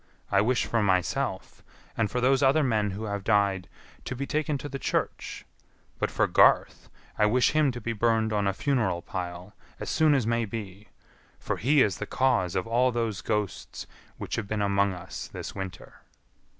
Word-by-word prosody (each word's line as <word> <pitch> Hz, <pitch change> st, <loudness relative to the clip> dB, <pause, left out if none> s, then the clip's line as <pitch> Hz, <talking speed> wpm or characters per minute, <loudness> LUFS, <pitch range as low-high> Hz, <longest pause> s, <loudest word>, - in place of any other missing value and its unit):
I 100 Hz, -1 st, +4 dB
wish 120 Hz, +3 st, +1 dB
for 115 Hz, -, 0 dB
myself, 95 Hz, -3 st, -1 dB, 0.3 s
and 110 Hz, -3 st, 0 dB
for 125 Hz, -, -2 dB
those 130 Hz, +2 st, +3 dB
other 140 Hz, +3 st, +4 dB
men 110 Hz, -5 st, +1 dB
who 100 Hz, +3 st, -5 dB
have 100 Hz, -2 st, -3 dB
died, 100 Hz, -2 st, +1 dB, 0.4 s
to 130 Hz, -, -4 dB
be 140 Hz, +2 st, -3 dB
taken 155 Hz, 0 st, -1 dB
to 140 Hz, -, -6 dB
the 140 Hz, -1 st, -6 dB
church; -, -, -3 dB, 0.5 s
but -, -, 0 dB
for -, -, +1 dB
Garth, -, -, +3 dB, 0.3 s
I 105 Hz, -, +5 dB
wish 125 Hz, +4 st, +3 dB
him 155 Hz, -3 st, +3 dB
to 120 Hz, -, -6 dB
be 115 Hz, 0 st, -3 dB
burned 110 Hz, 0 st, +1 dB
on 100 Hz, -1 st, +1 dB
a -, -, +3 dB
funeral 115 Hz, -8 st, 0 dB
pile 90 Hz, +1 st, -6 dB, 0.3 s
as -, -, -4 dB
soon 155 Hz, -2 st, +4 dB
as 130 Hz, -5 st, +1 dB
may 115 Hz, 0 st, +1 dB
be, 105 Hz, -1 st, -7 dB, 0.5 s
for -, -, -3 dB
he 140 Hz, +4 st, +4 dB
is 100 Hz, -3 st, 0 dB
the -, -, -4 dB
cause 120 Hz, -10 st, +1 dB
of 95 Hz, -, 0 dB
all 120 Hz, +3 st, +2 dB
those 115 Hz, -4 st, -2 dB
ghosts 105 Hz, -3 st, -3 dB, 0.3 s
which -, -, -4 dB
have 110 Hz, -, -3 dB
been 110 Hz, 0 st, -2 dB
among 100 Hz, 0 st, +2 dB
us 90 Hz, -1 st, -7 dB
this -, -, -7 dB
winter." 95 Hz, -1 st, -8 dB
110 Hz, 190 wpm, -27 LUFS, 100-125 Hz, 0.5 s, I